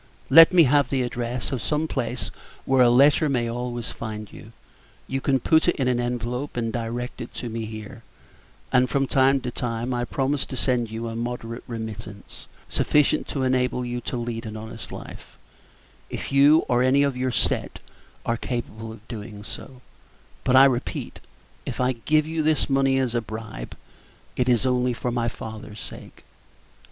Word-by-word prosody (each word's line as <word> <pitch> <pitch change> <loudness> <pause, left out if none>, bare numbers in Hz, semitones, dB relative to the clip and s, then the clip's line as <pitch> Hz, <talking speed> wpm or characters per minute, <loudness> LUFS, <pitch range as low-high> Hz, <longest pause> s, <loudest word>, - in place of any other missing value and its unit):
Let 165 +5 +10
me 180 -2 +7
have 145 0 +3
the 130 -2 +1
address 120 0 -3
of 130 -4 -2
some 155 +1 0
place 120 -3 -3 0.3
where 130 -1 +4
a 120 - +7
letter 140 +5 +5
may 120 -4 +1
always 120 0 -3
find 110 -2 -7
you 110 - -12 0.6
you 135 0 -2
can 135 -1 +2
put 160 +7 +3
it 175 - +3
into 130 -3 +1
an 120 - 0
envelope 120 +3 -3
and 115 -1 -1
direct 120 +1 -4
it 120 - -7
to 120 - -4
me 115 0 -4
here 110 +1 -8 0.7
and 125 -1 +4
from 135 0 +1
time 135 +1 +3
to 125 - -4
time 120 +1 -3
I 120 0 -1
promise 135 +2 0
to - - -6
send 125 -3 +1
you 115 +1 -4
a 115 - -5
moderate 115 0 -4
remittance, 110 -3 -7 0.2
sufficient 150 +1 +2
to 135 - -2
enable 125 -1 +1
you 120 0 -3
to 125 - -4
lead 115 -1 -4
an 110 0 -6
honest 110 +1 -9
life, - - -10 0.7
if - - -5
you 145 +3 +6
or 125 0 +2
any 130 +2 +4
of 140 -2 0
your 130 0 -1
set - - 0 0.5
are 115 - 0
capable 115 -2 -5
of 110 0 -13
doing 105 -2 -8
so; 125 +4 -9 0.6
but 130 - +3
I 135 +1 +9
repeat, 130 -2 -1 0.4
if - - -6
I 125 0 +2
give 155 +6 +1
you 160 0 -2
this 155 0 +2
money 135 -1 +2
as 130 -3 0
a 120 - +1
bribe, 110 - -7 0.6
it 125 0 +1
is 120 +1 +3
only 125 -1 +2
for 120 +1 -3
my 120 -1 0
father's 110 -2 -7
sake." - - -10
125 Hz, 180 wpm, -24 LUFS, 115-135 Hz, 0.7 s, Let